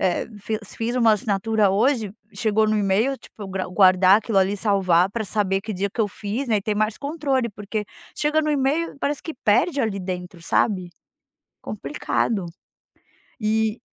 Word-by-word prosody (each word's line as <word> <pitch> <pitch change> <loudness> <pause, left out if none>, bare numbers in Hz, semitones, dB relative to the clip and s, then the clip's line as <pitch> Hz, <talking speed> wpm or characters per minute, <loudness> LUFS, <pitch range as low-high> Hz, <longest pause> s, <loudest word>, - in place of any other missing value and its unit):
eh, 185 -2 0
fi 215 +2 -2
se - - -12
fiz 235 +2 -2
uma 230 -3 +5
assinatura 210 0 +1
hoje, 220 0 +1 0.2
chegou 220 -1 +2
no 215 0 +1
e-mail, 210 +7 +1
tipo, 210 -5 -11
gra 190 -1 -3
guardar 185 +1 +6
aquilo 220 -2 0
ali, 195 +2 +2
salvar 190 -4 +3
pra 220 0 -3
saber 195 -1 0
que 215 +1 -5
dia 195 +2 -1
que 215 - -4
eu 210 - +2
fiz, 215 +6 -4
né, 220 - +3
e 200 - -2
ter 210 0 -1
mais 215 +1 0
controle, 280 -4 -1
porque 210 +1 -5 0.3
chega 300 +1 +2
no 305 - 0
e-mail, 290 +2 0
parece 285 0 -2
que 320 - -5
perde 275 +5 +2
ali 215 -5 -1
dentro, 180 -1 -6
sabe. 185 0 +1 0.7
Complicado. 195 +3 -2 1.0
Eh, 220 +1 +1
210 Hz, 170 wpm, -23 LUFS, 195-235 Hz, 1.0 s, guardar